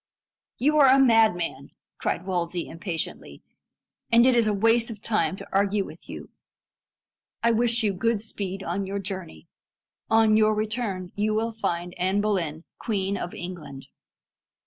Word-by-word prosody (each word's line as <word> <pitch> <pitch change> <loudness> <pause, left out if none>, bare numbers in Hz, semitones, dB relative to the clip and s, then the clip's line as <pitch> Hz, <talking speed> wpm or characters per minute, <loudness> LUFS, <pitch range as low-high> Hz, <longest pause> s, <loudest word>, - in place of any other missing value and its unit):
"You 300 +4 +2
are 280 - +7
a 265 +1 +6
madman!" 215 - +3 0.3
cried 180 - -2
Wolsey 175 -2 -2
impatiently, 165 -1 -5 0.7
"and 235 +1 +6
it 255 -1 +4
is 230 -2 +3
a - - +3
waste 225 +3 +2
of 220 -3 -7
time 215 -3 0
to - - -10
argue 200 0 +1
with - - -13
you. - - -8 1.1
I 235 - +4
wish 235 0 +2
you 205 -2 +1
good 230 +3 0
speed 195 -3 -5
on 190 +3 -3
your 200 +1 -3
journey. 185 - -6 0.6
On 220 -1 +4
your 215 0 +4
return 210 -4 -3
you 215 +1 0
will 225 +1 0
find 175 -5 -3
Anne 190 +3 +1
Boleyn 175 -7 -1 0.2
Queen 200 -3 -1
of 175 - -5
England." 155 -7 -8
200 Hz, 150 wpm, -25 LUFS, 180-225 Hz, 1.1 s, are